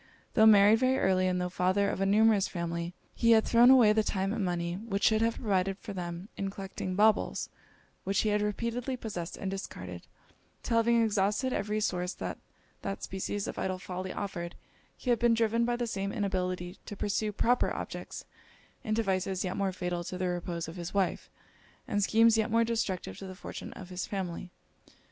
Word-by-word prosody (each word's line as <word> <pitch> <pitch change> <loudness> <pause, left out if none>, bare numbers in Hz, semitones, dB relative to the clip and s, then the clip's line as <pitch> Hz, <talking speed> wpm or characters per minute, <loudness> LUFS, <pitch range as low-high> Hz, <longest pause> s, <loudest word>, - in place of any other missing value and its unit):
Tho' 220 -1 +6
married 210 +1 +7
very 260 +1 +3
early, 185 -4 +2
and 180 0 0
tho' 180 - -1
father 185 +3 +1
of 195 - -2
a 195 - +2
numerous 210 0 +4
family, 170 0 -4 0.2
he 230 0 +4
had 220 -1 +4
thrown 240 +1 +6
away 245 -5 +7
the 220 - +3
time 195 -1 -1
and 225 -3 -1
money, 170 -1 -1
which 200 +1 -4
should 220 0 +4
have 230 0 +2
provided 195 -3 0
for 205 0 -8
them, 175 0 -5
in 195 - -2
collecting 195 -1 -5
baubles, 215 +1 +2 0.5
which 195 +1 +1
he 215 - +1
had 210 0 +2
repeatedly 235 +5 -2
possessed 180 -8 -5
and 190 - -3
discarded, 90 - -7 0.6
'till 230 - +1
having 230 0 +4
exhausted 210 +4 +1
every 210 +1 -1
source 180 -3 -1
that - - -5 0.4
that 195 0 -4
species 195 +1 -3
of - - -5
idle 185 -1 -1
folly 185 0 -5
offered, 175 -4 -5 0.4
he 250 - -1
had 235 - +2
been 235 -1 +4
driven, 230 +1 +2
by 240 0 0
the 240 0 -2
same 200 -3 -3
inability 185 -3 -2
to 205 - -7
pursue 210 +1 -1
proper 240 +4 +2
objects, - - -6 0.6
into 220 +1 0
vices 190 -1 -1
yet 185 -1 -2
more 195 -1 0
fatal 180 -1 -3
to 180 - -5
the 185 0 -1
repose 175 -1 -3
of 165 +3 -8
his 175 +2 -6
wife, 195 -2 0 0.6
and 205 - 0
schemes 225 +2 +4
yet 220 - +1
more 230 +1 +3
destructive 195 - -2
to 195 - -7
the 185 - -8
fortune - - -8
of 185 - -10
his 180 0 -4
family. 185 -2 -4
195 Hz, 195 wpm, -30 LUFS, 185-220 Hz, 0.6 s, married